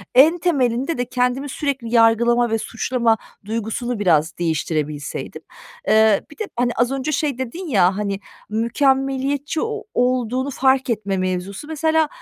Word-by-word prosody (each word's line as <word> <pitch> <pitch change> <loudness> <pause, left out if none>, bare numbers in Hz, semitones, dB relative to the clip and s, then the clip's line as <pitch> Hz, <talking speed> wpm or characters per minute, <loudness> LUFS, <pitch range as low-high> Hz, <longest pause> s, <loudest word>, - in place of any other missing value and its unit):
En 315 +7 +7
temelinde 275 -3 0
de 245 - -1
kendimi 250 +3 -1
sürekli 270 -5 -3
yargılama 235 +1 +4
ve 225 - +1
suçlama 230 0 0 0.3
duygusunu 225 +2 -3
biraz 160 -5 +2
değiştirebilseydim. 155 -3 -3 0.5
Eee, 220 -2 +5
bir - - -14
de, 435 - -2
hani, 240 0 +1
az 240 +2 +1
önce 270 +2 -2
şey 285 -3 -1
dedin 295 +8 -5
ya, 190 -6 +3
hani, 200 -2 -2 0.3
"Mükemmeliyetçi 270 +6 0
o 445 -1 -3
olduğunu 250 +1 0
fark 265 -1 +2
etme 200 -4 -1
mevzusu." 185 +7 -3
Mesela 315 0 +1
245 Hz, 140 wpm, -21 LUFS, 215-275 Hz, 0.5 s, En